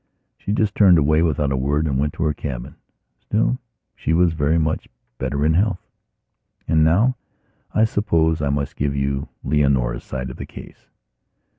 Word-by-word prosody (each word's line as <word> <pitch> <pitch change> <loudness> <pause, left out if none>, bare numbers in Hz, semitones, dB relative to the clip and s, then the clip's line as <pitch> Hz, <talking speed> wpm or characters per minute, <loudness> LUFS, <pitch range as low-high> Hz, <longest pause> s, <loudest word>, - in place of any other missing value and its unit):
She - - -5
just 105 -1 +1
turned 95 -5 +6
away 75 +1 +3
without 75 -4 +1
a - - +1
word 70 +4 0
and 70 -4 0
went 75 +1 0
to - - -3
her 75 -1 +1
cabin. 70 -2 -6 0.5
Still, - - 0 0.4
she 80 - -1
was 85 0 +3
very 80 +1 +1
much 80 -1 -1 0.3
better 70 +1 -1
in 80 - +3
health. 100 +3 +2 0.9
And 80 -1 +3
now, 105 +11 +3 0.6
I 110 - +4
suppose, 80 -8 +1
I 70 - 0
must 70 -1 -2
give 70 0 -1
you 70 0 -2
Leonora's 65 -4 +1
side 65 -1 -5
of - - -11
the - - -6
case.... - - -13
75 Hz, 170 wpm, -21 LUFS, 70-85 Hz, 0.9 s, turned